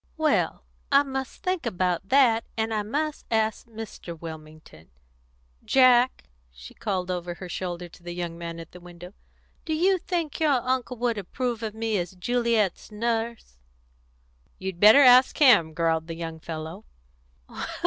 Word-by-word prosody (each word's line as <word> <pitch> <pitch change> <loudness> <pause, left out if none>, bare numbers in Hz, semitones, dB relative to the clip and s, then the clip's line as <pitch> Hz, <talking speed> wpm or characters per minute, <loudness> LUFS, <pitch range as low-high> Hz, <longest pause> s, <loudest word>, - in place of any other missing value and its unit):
"Well, 315 -1 +1 0.3
I 280 +1 +6
must 265 -1 -6
think 365 -8 -1
about 185 -3 -1
that, 245 -4 +4
and 220 0 -1
I 215 - 0
must 295 +8 -3
ask 220 -1 0
Mr. 215 -7 -9
Wilmington. 155 - -11 0.7
Jack," 255 -1 +4 0.3
she - - -13
called 185 -4 -3
over 175 -1 -4
her 180 - -8
shoulder 175 0 -5
to 175 - -18
the 175 0 -7
young 175 -1 -4
man 170 0 -7
at 165 - -10
the 180 - -12
window, 175 +1 -12 0.5
"do 315 - -2
you 370 +4 +2
think 335 -4 -3
your 310 -3 +3
uncle 255 0 -1
would 235 -2 -1
approve 235 +4 -3
of 220 -1 -4
me 220 -2 -1
as 175 +1 -5
Juliet's 230 0 0
Nurse?" 225 - -3 1.0
"You'd 190 -2 -6
better 215 +8 +8
ask 255 0 +6
him," 245 - +6
growled 160 0 0
the 165 - -5
young 165 -1 -6
fellow. 160 +5 -7
215 Hz, 150 wpm, -26 LUFS, 175-250 Hz, 1.0 s, better